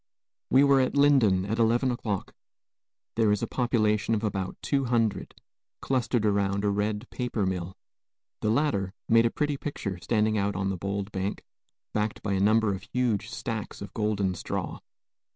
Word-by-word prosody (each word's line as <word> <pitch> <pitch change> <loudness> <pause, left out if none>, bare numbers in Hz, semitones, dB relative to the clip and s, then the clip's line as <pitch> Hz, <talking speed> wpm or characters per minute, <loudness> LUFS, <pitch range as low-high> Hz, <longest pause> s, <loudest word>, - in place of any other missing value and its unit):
We 135 +2 +6
were 140 -1 +5
at 130 - 0
Lyndon 125 -10 +4
at 110 +3 -2
eleven 120 +3 +3
o'clock. 110 -5 -3 0.8
There 110 -2 +3
is 105 +2 0
a - - -1
population 110 -3 +1
of 105 - -3
about 95 -3 -2
two 135 -2 +1
hundred, 115 -5 0 0.4
clustered 125 -3 0
around 100 -1 +1
a 100 - +3
red 105 +3 -1
paper 120 -5 -2
mill. 95 0 -3 0.6
The 105 - 0
latter 110 -7 0
made 115 +1 +5
a - - 0
pretty 145 +3 -1
picture 100 -11 -4
standing 110 +4 +1
out 100 0 0
on 95 0 -1
the - - -2
bold 100 +2 -3
bank, 95 +1 -3 0.5
backed 105 0 -2
by 100 - -1
a 95 - +1
number 110 +1 +3
of 95 - -5
huge 115 -5 0
stacks 110 -1 -5
of 100 - -8
golden 105 -3 0
straw. 90 - -4
105 Hz, 170 wpm, -27 LUFS, 100-120 Hz, 0.8 s, We